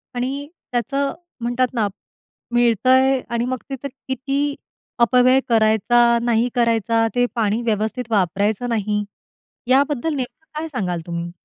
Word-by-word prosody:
आणि 270 +4 -3 0.2
त्याचं 275 +3 -1 0.3
म्हणतात 245 +1 0
ना, 220 -4 +1 0.7
मिळतंय 255 +3 +4
आणि 235 0 -1
मग 255 0 -2
तिथे 270 0 -5
किती 275 +2 -3 0.4
अपव्यय 250 +2 +5
करायचा, 235 +2 +4
नाही 235 0 +1
करायचा. 230 -1 +2
ते 245 - +3
पाणी 220 0 +1
व्यवस्थित 225 +2 -2
वापरायचं 205 +4 +1
नाही. 210 -2 0 0.6
याबद्दल 280 +3 +2
नेमकं 270 +4 -6
काय 325 - -4
सांगाल 180 -7 -2
तुम्ही? 170 0 -4
240 Hz, 120 wpm, -21 LUFS, 220-260 Hz, 0.7 s, अपव्यय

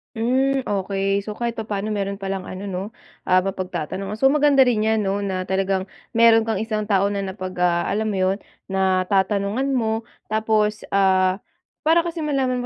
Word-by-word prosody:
Hmm 265 +4 +1
okey, 195 -1 -1
so 210 - -4
kahit 235 0 -3
papano 210 -1 -3
meron 200 -1 -2
palang 195 -1 -4
ano 185 +1 -7
'no, 190 -2 -3 0.4
ah 185 0 +4
mapagtatanongan. 185 +1 -4
So 270 +5 +4
maganda 290 -2 +5
rin 245 -4 +1
yan 220 0 +1
no 195 +1 0
na 190 -2 -2
talagang 190 0 -1 0.2
meron 225 -1 +5
kang 225 - 0
isang 215 +1 -2
tao 200 -1 +2
na 200 - -2
napag, 190 -1 -5
ah, 175 -1 +2
alam 220 +2 -1
mo 210 - -1 0.2
yon 195 - -2 0.3
natatanungan 195 +6 +1
mo 225 -1 -1 0.2
tapos 215 -1 +1
ah, 190 -1 +2 0.4
para 325 +2 +5
kasi 340 0 -5
malaman 260 -4 0
205 Hz, 165 wpm, -22 LUFS, 190-225 Hz, 0.4 s, maganda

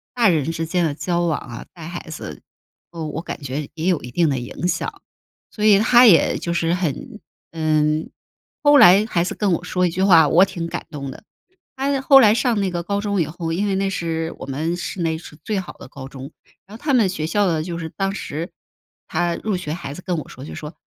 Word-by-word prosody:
大 240 -2 +4
人 165 -4 +2
之 165 0 -3
间 175 +1 0
的 150 - -1
交 175 +2 -1
往 160 -3 0
啊， 120 -3 -9
带 165 -2 -9
孩 175 -1 -7
子， 155 - -8 0.5
呃 165 -2 -5
我 155 +2 -4
感 165 - -7
觉 140 +2 -4
也 165 +2 -3
有 180 -5 +2
一 120 - -8
定 170 +4 +2
的 135 - -1
影 125 +8 -4
响。 - - -3 0.5
所 210 - -5
以 210 -2 +7
他 240 +3 +6
也 175 -7 +5
就 170 - -3
是 170 0 +1
很 185 - -3 0.3
嗯， 155 -1 0 0.5
后 290 0 +7
来 200 0 +7
孩 170 -6 0
子 - - -4
跟 200 -4 +1
我 170 - -2
说 180 0 0
1 - - -1
句 185 - -2
话， 165 -5 +6
我 180 +3 +6
挺 185 -3 -5
感 - - -5
动 140 -2 -6
的。 - - -12 0.5
他 275 +1 0
后 270 0 +7
来 215 -4 +6
上 235 -3 +1
那 195 - 0
个 175 -1 -3
高 200 +3 -1
中 200 -2 -1
以 160 - +1
后， 165 +1 -4
因 195 +5 0
为 195 - 0
那 195 0 0
是 165 -3 -3
我 - - -7
们 155 +6 -2
市 180 +1 -5
内 160 -1 0
是 155 -2 -12
最 215 -3 -1
好 185 - -6
的 - - -13
高 135 0 -9
中， 135 +1 -9 0.4
然 210 - -11
后 - - -17
他 290 -2 +1
们 225 -6 +4
学 155 -4 -3
校 205 +5 +1
呢， 160 -2 0
就 170 0 -5
是 165 -1 -5
当 195 +2 -2
时 170 -2 -5 0.6
他 170 +1 0
入 210 -3 -2
学 165 -4 -5
孩 165 -5 -6
子 180 - -9
跟 180 -2 -1
我 - - -6
说 130 - -10
就 - - -8
说： 150 +2 -8
170 Hz, 255 characters per minute, -21 LUFS, 160-195 Hz, 0.6 s, 以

